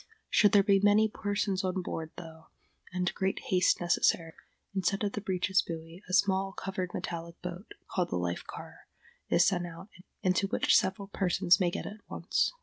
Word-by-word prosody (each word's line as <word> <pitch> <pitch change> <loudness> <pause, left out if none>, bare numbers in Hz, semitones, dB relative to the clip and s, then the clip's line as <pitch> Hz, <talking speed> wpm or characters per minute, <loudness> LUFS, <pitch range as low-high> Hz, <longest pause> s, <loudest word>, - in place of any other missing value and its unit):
Should 205 - +5
there 200 -1 +7
be 200 -1 +4
many 205 +2 +5
persons 205 -2 -1
on 185 0 -1
board, 160 -2 -4
though, 160 -2 -11 0.4
and 180 -1 -1
great 190 0 -1
haste 185 -1 +3
necessary, 170 -1 +1 0.4
instead 195 +1 0
of 205 - 0
the 210 - -4
breeches 190 -1 +1
buoy 165 +1 -8
a - - -5
small 195 0 +2
covered 190 -2 -4
metallic 170 0 -5
boat, 180 +3 -7 0.2
called 180 -2 0
the - - -2
life 90 0 -2
car, - - -11 0.4
is 175 - +5
sent 175 -3 +1
out, 170 +4 -10 0.3
into 185 +1 +2
which - - +3
several 195 +1 +1
persons 180 -1 +3
may 180 -2 +2
get - - -4
at 210 - -7
once. - - 0
185 Hz, 175 wpm, -30 LUFS, 175-195 Hz, 0.4 s, there